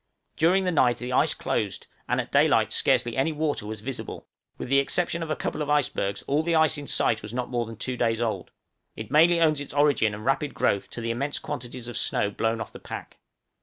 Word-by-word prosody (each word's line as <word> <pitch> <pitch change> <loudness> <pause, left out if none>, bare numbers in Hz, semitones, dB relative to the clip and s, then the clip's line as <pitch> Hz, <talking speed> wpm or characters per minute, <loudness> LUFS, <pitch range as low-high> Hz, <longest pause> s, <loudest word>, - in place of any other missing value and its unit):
During 180 +4 +3
the 180 - +1
night 125 -7 +3
the 125 +1 -5
ice - - +3
closed, - - -2 0.2
and - - +1
at - - -4
daylight - - +3
scarcely 120 -1 +2
any 135 +5 +1
water 150 -8 -2
was 110 -1 -6
visible; 130 +3 -6 0.3
with - - -5
the 140 +2 +4
exception 170 +4 0
of 165 - -4
a 155 - 0
couple - - -3
of 150 - -2
icebergs, 135 -9 0
all 145 +2 +1
the 165 +1 0
ice 160 -1 +4
in 145 -1 -6
sight 115 - +1
was 105 +3 -7
not 125 0 -3
more 120 -2 -1
than 115 - -8
two 125 +2 -3
days 115 -2 +1
old; 115 -2 -2 0.5
it 110 -1 -8
mainly 170 +3 +5
owes 155 -3 +3
its 145 - -8
origin 145 -8 +3
and 105 +1 -9
rapid 135 +2 0
growth 100 - +1
to 120 - -7
the 115 0 -1
immense 140 +5 -2
quantities 120 0 -6
of 120 - -4
snow 105 - 0
blown 115 +2 -1
off - - -6
the - - -11
pack. - - -8
130 Hz, 230 wpm, -26 LUFS, 115-150 Hz, 0.5 s, mainly